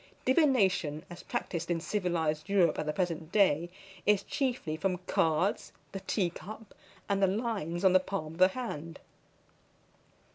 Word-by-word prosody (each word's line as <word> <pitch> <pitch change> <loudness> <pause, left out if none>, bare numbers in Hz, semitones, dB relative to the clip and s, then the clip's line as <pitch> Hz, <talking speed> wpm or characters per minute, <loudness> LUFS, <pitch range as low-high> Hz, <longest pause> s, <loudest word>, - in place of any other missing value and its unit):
Divination, 200 - +2
as 175 - -8
practised 170 -1 -4
in 170 -1 +1
civilised 165 -3 -1
Europe 195 -4 +3
at 155 - -3
the - - +1
present 165 -2 -2
day, 175 -5 +3 0.3
is 210 -2 +3
chiefly 250 - -2
from 185 +3 -1
cards, 165 +5 +1 0.2
the 195 - -5
tea 190 -2 0
cup, 215 +4 -10 0.3
and 200 0 0
the 195 - +5
lines 195 -4 -2
on 185 - +6
the 185 - +7
palm 185 -5 -4
of 165 - -13
the 185 - +8
hand. 175 -8 -5
185 Hz, 150 wpm, -30 LUFS, 165-200 Hz, 0.3 s, the